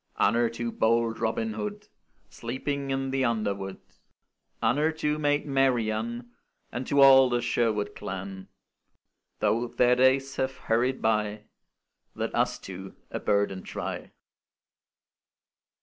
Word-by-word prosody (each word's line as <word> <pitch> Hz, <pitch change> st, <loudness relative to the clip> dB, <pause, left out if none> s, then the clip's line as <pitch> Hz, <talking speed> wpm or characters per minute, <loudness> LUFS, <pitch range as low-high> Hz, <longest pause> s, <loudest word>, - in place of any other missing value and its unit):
Honour 115 Hz, +3 st, +3 dB
to 115 Hz, 0 st, -4 dB
bold 115 Hz, 0 st, +1 dB
Robin 110 Hz, -1 st, -1 dB
Hood, 105 Hz, -1 st, -5 dB, 0.4 s
Sleeping 135 Hz, +3 st, -4 dB
in 135 Hz, 0 st, -1 dB
the 135 Hz, 0 st, +1 dB
underwood! 100 Hz, -5 st, -1 dB, 0.8 s
Honour 150 Hz, +5 st, +3 dB
to 150 Hz, -1 st, -1 dB
maid 145 Hz, -1 st, +1 dB
Marian, 120 Hz, -3 st, 0 dB, 0.4 s
And 125 Hz, +1 st, -4 dB
to 140 Hz, 0 st, +3 dB
all 135 Hz, -1 st, +8 dB
the 120 Hz, 0 st, +1 dB
Sherwood 105 Hz, -4 st, 0 dB
clan! 95 Hz, 0 st, -6 dB, 0.9 s
Though 120 Hz, +2 st, +2 dB
their 125 Hz, +1 st, +3 dB
days 130 Hz, +1 st, +3 dB
have 130 Hz, 0 st, -1 dB
hurried 125 Hz, +3 st, 0 dB
by 105 Hz, -1 st, 0 dB, 0.7 s
Let -, -, -3 dB
us -, -, +1 dB
two 95 Hz, 0 st, -9 dB, 0.2 s
a -, -, -3 dB
burden 100 Hz, -2 st, 0 dB
try. -, -, -5 dB
120 Hz, 120 wpm, -27 LUFS, 105-135 Hz, 0.9 s, all